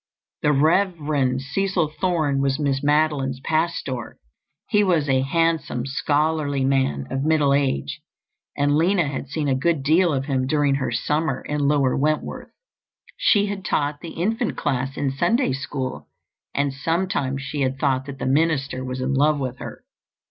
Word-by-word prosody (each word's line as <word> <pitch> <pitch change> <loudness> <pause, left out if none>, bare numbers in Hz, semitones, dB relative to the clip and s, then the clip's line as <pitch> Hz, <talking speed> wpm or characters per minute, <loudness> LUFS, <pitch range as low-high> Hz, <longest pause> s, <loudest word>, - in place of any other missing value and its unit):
The 150 - +3
Rev. 170 +7 +3 0.4
Cecil 175 +4 -1
Thorne 155 -7 +1
was 135 -1 +1
Miss 140 -3 0
Madeline's 145 -3 +1
pastor. 155 -5 -2 0.5
He 205 0 +3
was 170 -7 +2
a 130 -1 +3
handsome, 160 -3 0
scholarly 145 0 0
man 130 - +1
of 135 - -1
middle 150 -3 +3
age, 135 - -1 0.6
and 145 0 +2
Lina 170 +1 +2
had 140 -1 -4
seen 150 +1 -2
a 135 - +2
good 145 +2 0
deal 165 +4 +3
of 135 -2 -1
him 130 -2 0
during 145 -1 +2
her 135 -1 -1
summer 150 -3 -1
in 145 -1 -1
Lower 140 -3 +2
Wentworth. 155 +3 -1 0.7
She 205 -2 +3
had 200 -1 -4
taught 145 -3 -1
the 170 - -8
infant 225 +7 -1
class 135 -2 -2
in 140 -2 0
Sunday 175 - +1
School 135 -1 -4 0.5
and 140 -1 0
sometimes 140 -3 -1
she 140 +2 -4
had 130 0 0
thought 135 -1 0
that 140 -1 -7
the - - -4
minister 140 -2 +1
was 130 0 -4
in 130 +1 -1
love 145 +2 +3
with 130 -2 -4
her. - - -8
145 Hz, 160 wpm, -23 LUFS, 135-160 Hz, 0.7 s, The